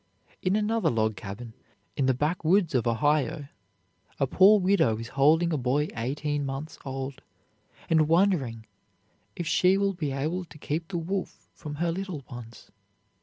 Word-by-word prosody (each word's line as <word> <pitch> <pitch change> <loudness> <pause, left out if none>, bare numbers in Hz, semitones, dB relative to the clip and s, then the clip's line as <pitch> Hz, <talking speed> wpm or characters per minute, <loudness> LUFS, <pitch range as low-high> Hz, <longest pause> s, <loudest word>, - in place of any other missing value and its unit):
In 185 +2 +1
another 215 +2 +1
log 110 -2 0
cabin, 110 +3 -8 0.4
in 135 -3 +1
the 130 - +3
backwoods 165 +5 +1
of 120 -3 +1
Ohio, 145 +5 +1 0.7
a 140 - +3
poor 195 +9 +6
widow 185 - +2
is 115 +1 -7
holding 160 +5 +3
a - - +1
boy 135 +5 0
eighteen 145 +5 -2
months 140 +3 -5
old, 135 0 -5 0.7
and 160 -2 +3
wondering 160 - +2 0.7
if 175 - -4
she 185 +4 +3
will 200 0 +1
be 155 -6 -3
able 155 +7 -2
to 150 -2 -15
keep 160 +3 -3
the 185 - -3
wolf 185 +3 -4
from 150 -2 -7
her 170 +2 0
little 180 -5 -5
ones. 120 -1 -10
150 Hz, 155 wpm, -27 LUFS, 130-175 Hz, 0.7 s, poor